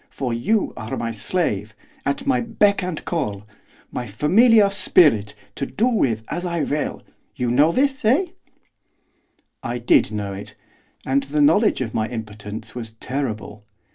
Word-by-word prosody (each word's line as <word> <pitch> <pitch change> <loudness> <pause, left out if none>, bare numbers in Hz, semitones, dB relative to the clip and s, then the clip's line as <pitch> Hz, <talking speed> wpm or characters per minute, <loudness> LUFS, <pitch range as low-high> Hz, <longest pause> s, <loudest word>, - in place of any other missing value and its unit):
For 130 -4 -3
you 205 - 0
are 110 +1 -5
my 115 -1 -2
slave, 110 - -2 0.3
at 140 - -1
my 270 -2 +2
beck 210 -4 +2
and 180 -3 -4
call, 105 - -3 0.5
my 125 - -4
familiar 200 - +4
spirit, 145 - +3 0.2
to 140 - -4
do 225 - 0
with 130 - +1
as 175 +3 -3
I 170 -3 -1
will, 150 +1 -2 0.3
you 125 -1 -1
know 145 +6 +4
this, 270 +4 +1
eh?' 265 - +4 1.4
I 120 +1 -3
did 120 -3 +3
know 105 -2 -3
it, 100 +1 -9 0.5
and 135 +1 +2
the 145 +2 -3
knowledge 165 - +4
of 115 -4 -3
my 110 0 0
impotence 105 -2 -7
was 115 -3 -7
terrible. 110 -4 -5
135 Hz, 150 wpm, -22 LUFS, 110-185 Hz, 1.4 s, familiar